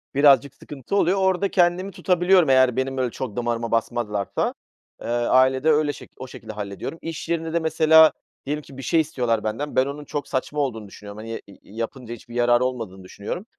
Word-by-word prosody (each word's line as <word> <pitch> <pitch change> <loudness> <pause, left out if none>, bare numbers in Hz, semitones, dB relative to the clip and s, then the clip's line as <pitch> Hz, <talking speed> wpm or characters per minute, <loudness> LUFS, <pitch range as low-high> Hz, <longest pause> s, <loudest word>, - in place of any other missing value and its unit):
birazcık 140 -1 +5
sıkıntı 145 +6 -6
oluyor. 195 -1 +3
Orada 190 0 +1
kendimi 180 +2 +2
tutabiliyorum 180 -2 +3
eğer 130 -2 +4
benim, 130 +1 -2
böyle, 130 -2 0
çok 115 -4 -6
damarıma 120 -1 -2
basmadılarsa. 115 -3 -1 0.5
Eee, - - -7
ailede 130 +4 +3
öyle 150 -1 +2
şek - - -12
o 130 - -8
şekilde 110 -3 -10
hallediyorum. 105 +9 -6
İş 165 0 -6
yerinde 165 -1 -2
de 170 - +2
mesela 160 -1 +6 0.3
diyelim 150 +2 -2
ki 135 - -14
bir 135 - -6
şey 165 - +2
istiyorlar 125 -8 -1
benden, 115 +7 -3
ben 130 - +4
onun 145 +1 -6
çok 145 0 -4
saçma 145 +2 -3
olduğunu 115 -7 -2
düşünüyorum, 100 +1 -11
hani, 115 +1 -6
i 100 - -16 0.2
yapınca 115 +1 -5
hiçbir 120 +1 -12
yararı 120 0 +3
olmadığını 115 -7 -5
düşünüyorum. 100 - -6
130 Hz, 185 wpm, -23 LUFS, 115-160 Hz, 0.5 s, mesela